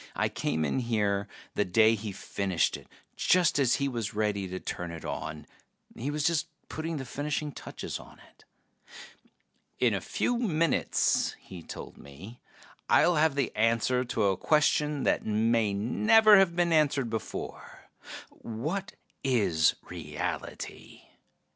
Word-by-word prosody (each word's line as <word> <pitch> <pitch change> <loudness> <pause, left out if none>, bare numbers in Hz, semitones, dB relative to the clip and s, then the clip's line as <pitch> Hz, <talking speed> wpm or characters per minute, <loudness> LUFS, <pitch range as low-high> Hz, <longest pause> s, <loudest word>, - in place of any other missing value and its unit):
I - - +1
came 80 +1 -1
in 70 - 0
here 105 -4 0 0.3
the - - +1
day 110 +4 +4
he 110 -1 -4
finished 95 -1 -1
it, - - -11 0.3
just 180 -5 +3
as 130 -3 +3
he 140 - 0
was 115 -5 -3
ready 105 -2 0
to 95 0 -5
turn 90 -1 -5
it 85 -1 -8
on. 75 -1 -5 0.5
He 130 +5 -4
was 150 0 -2
just 160 0 +1 0.2
putting 160 0 -4
the 135 - -5
finishing 150 +3 -3
touches - - -7
on - - -15
it. - - -25 1.3
"In - - +3
a - - -1
few 245 -1 -1
minutes," 165 - +1
he 90 -3 -11
told - - -9
me, 85 - -12 0.5
"I'll 175 -2 +5
have 155 -2 +3
the 140 - -1
answer 115 +3 +2
to 125 -3 -1
a 95 -2 +2
question 150 - +2
that - - +1
may 110 0 +2
never 215 - +5
have 180 -3 +3
been 175 -1 +2
answered 145 -6 +2
before: 110 - -6 0.4
what 155 - -5 0.3
is 100 -12 +3
reality? - - -6
120 Hz, 140 wpm, -29 LUFS, 100-150 Hz, 1.3 s, I'll